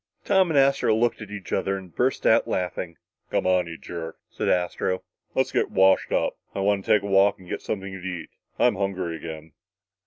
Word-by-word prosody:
Tom 190 -3 +4
and 155 - +1
Astro 135 -5 +4
looked 115 +1 +1
at 105 - -8
each 105 -2 -7
other 95 0 0
and 95 -3 -11
burst 130 +2 0
out 115 - +5
laughing. 90 -1 -3 0.3
"Come - - 0
on, 90 -1 +3
you 80 -1 -7
jerk," 80 -1 -7
said - - -2
Astro, 90 +1 0 0.3
"let's - - +1
get - - +1
washed 95 0 +4
up. - - 0 0.2
I - - -2
wanta 100 0 +1
take 105 -2 +5
a - - -5
walk 100 0 +4
and 95 - -16
get - - -4
something 95 -2 -4
to 95 - -6
eat. 90 -2 -6 0.3
I'm 120 -5 +3
hungry 95 -4 -2
again!" 80 0 -8
95 Hz, 205 wpm, -25 LUFS, 90-105 Hz, 0.3 s, out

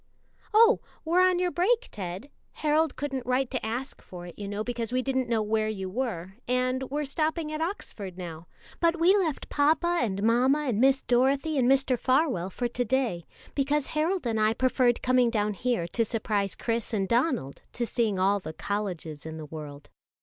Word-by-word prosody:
"Oh, 455 +2 +6 0.3
we're 345 +3 +3
on 370 -1 +4
your 360 0 0
break, 460 +8 +1
Ted 190 +7 -6 0.2
Harold 310 0 +1
couldn't 270 -2 -3
write 255 +1 0
to 255 - -2
ask 240 +5 -4
for 175 -1 -10
it, 175 - -9
you 205 - -6
know, 205 +1 -3
because 235 -1 -3
we 255 0 0
didn't 260 -2 -1
know 225 -2 +1
where 215 0 0
you 190 -3 -4
were, 195 -6 -3
and 255 +1 +1
we're 295 +2 -2
stopping 310 +2 -1
at 310 +1 -3
Oxford 210 - -5
now; 170 -2 -7 0.3
but 335 0 +2
we 360 +4 +5
left 340 -8 -1
papa 320 +4 +2
and 200 -4 -1
mamma 255 +6 +3
and 230 -3 +1
Miss 270 0 +4
Dorothy 270 +5 +2
and 250 -1 +3
Mr. 270 -2 +3
Farwell 255 - +1
for 240 +6 -2
to 240 +1 -2
day, 235 -9 -1 0.3
because 285 +1 0
Harold 325 +2 0
and 225 -2 0
I 215 +1 +3
preferred 255 -1 +2
coming 255 -1 +4
down 210 -2 0
here 235 -5 -1
to 230 - +1
surprise 210 -3 -1
Chris 230 0 -2
and 195 -2 0
Donald 235 - 0
to 240 - -1
seeing 225 -4 0
all 195 +2 +2
the 160 -4 -7
colleges 180 -7 -4
in 160 0 -6
the 155 - -7
world." 150 -2 -9
245 Hz, 190 wpm, -27 LUFS, 205-285 Hz, 0.3 s, Oh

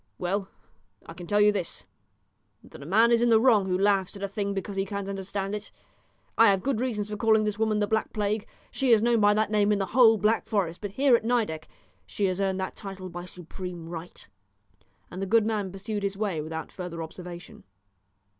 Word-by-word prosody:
Well, 190 +2 -2 0.6
I 165 - -9
can 175 0 -10
tell 205 +3 +2
you 210 0 +6
this, 190 -5 -4 0.8
that - - -13
a 140 - -9
man 225 +6 +4
is 235 0 +4
in 240 - +3
the 225 -1 +6
wrong 220 -5 +4
who 180 -1 +1
laughs 195 0 +1
at 200 - -8
a - - 0
thing 200 0 -3
because 195 +1 -4
he 195 - 0
can't 200 0 -5
understand 195 0 -4
it. 210 0 -6 0.7
I 230 - +8
have 195 -2 +3
good 265 -4 0
reasons 210 -5 -2
for - - -2
calling 220 0 +3
this 210 0 -2
woman 220 -1 +1
the 210 - +2
Black 220 +1 -1
Plague. 210 0 -2 0.2
She 270 -2 -1
is 220 -1 +5
known 235 -1 +3
by 205 0 +4
that 215 0 +1
name 210 -1 +3
in 210 - +3
the 195 - -1
whole 225 -3 +6
Black 215 +2 +1
Forest, 190 -6 -1
but 205 - -4
here 265 +1 +4
at 230 - 0
Nideck 220 -10 -1 0.4
she 205 - -1
has 185 0 -1
earned 190 -1 0
that 190 - -4
title 195 -2 -8
by 175 0 -7
supreme 180 -1 -8
right." 170 +1 -9 0.8
And 185 - -6
the 195 - -2
good 225 +1 +4
man 210 -4 -1
pursued 205 +2 -4
his 200 0 -2
way 195 -7 -1
without 160 +1 -6
further 175 -3 -6
observation. 175 +1 -10
200 Hz, 220 wpm, -27 LUFS, 185-215 Hz, 0.8 s, I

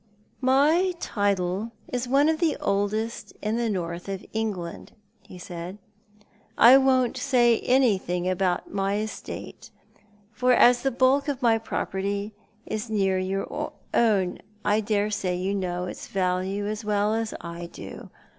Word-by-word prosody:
" - - -38 0.2
My 340 +6 +3
title 200 - -1
is 250 0 -3
one 275 +4 +4
of 320 0 +1
the 330 -4 +1
oldest 205 +3 -1
in 215 +1 -1
the 235 -1 0
North 175 -2 -4
of 195 0 -5
England," 205 -6 -4 0.3
he 185 - -13
said. 180 +1 -7 0.4
*' - - -31 0.3
I 240 +3 +9
won't 260 -2 +2
say 245 -4 +3
anything 195 -9 +1
about 185 -1 -1
my 195 0 0
estate 215 +1 -6 0.3
— 205 0 -33
for 250 +3 +2
as 245 0 +6
the 270 - +1
bulk 265 +3 +2
of 275 -3 -3
my 225 -2 +4
property 200 -1 -3 0.3
is 215 +2 -4
near 195 -3 +1
your 190 +1 -2 0.5
own, 200 -6 +2 0.3
I 210 +1 +3
daresay 205 -3 0
you 190 +2 -1
know 180 -2 -2
its 180 - -7
value 190 +1 -1
as 215 +1 -3
well 210 0 +1
as 225 0 -2
I 170 0 -7
do. - - -10
205 Hz, 150 wpm, -26 LUFS, 190-235 Hz, 0.5 s, I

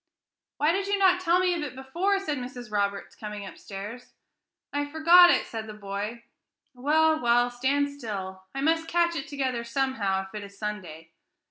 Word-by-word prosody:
"Why 300 +2 +3
did 390 +2 -1
you 405 0 +1
not 370 -2 +4
tell 345 -1 +3
me 365 -1 +2
of 340 - -2
it 275 -4 -5
before?" 340 +10 0
said 300 -8 -3
Mrs. 245 -2 -8
Roberts, 200 -1 -1
coming 210 -1 -7
upstairs. 205 +5 -9 0.6
"I 290 0 0
forgot 335 +4 +7
it," - - +3
said 220 -1 -6
the 215 - -8
boy. 210 +3 -5 0.5
"Well, 310 +5 +3
well, 240 0 +3
stand 275 +4 +1
still; 195 -8 -6
I 270 - -2
must 325 +2 +1
catch 340 0 +2
it 275 - -4
together 260 -4 -2
somehow, 235 -6 0
if 190 - -15
it 210 -1 -5
is 200 0 -12
Sunday. 185 -7 -6
255 Hz, 175 wpm, -27 LUFS, 210-315 Hz, 0.6 s, forgot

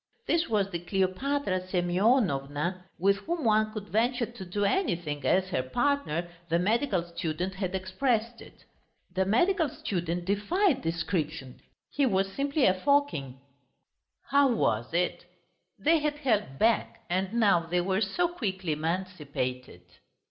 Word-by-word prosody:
This 335 -3 +1
was 200 -3 +1
the 170 - -2
Kleopatra 190 +4 0
Semyonovna 180 - +1
with 200 +3 +3
whom 330 - -3
one 215 0 +3
could 215 -3 -7
venture 235 +5 +1
to 235 -4 -10
do 200 +3 -1
anything, 175 - -1
as 185 +7 +2
her 145 - 0
partner, 175 - 0 0.2
the 165 - +3
medical 205 +1 +1
student, 170 +1 -3
had 190 -1 -3
expressed 225 +5 -1
it. - - -15 0.5
The 190 +1 +1
medical 325 - +2
student 175 -6 -3
defied 270 - +1
description: 165 -5 -3 0.3
he 280 -2 +2
was 195 -3 0
simply 280 0 +1
a 185 - +5
Fokin. 185 - +1 0.9
How 280 -1 +5
was 120 - 0
it? 175 +2 -1 0.5
They 325 +2 +3
had 300 0 -1
held 215 - 0
back 225 +6 +1
and 185 +3 -1
now 215 -6 +4
they 175 +1 +1
were 190 +3 0
so 285 - +1
quickly 190 - -3
emancipated! 150 - -3
190 Hz, 135 wpm, -28 LUFS, 175-240 Hz, 0.9 s, a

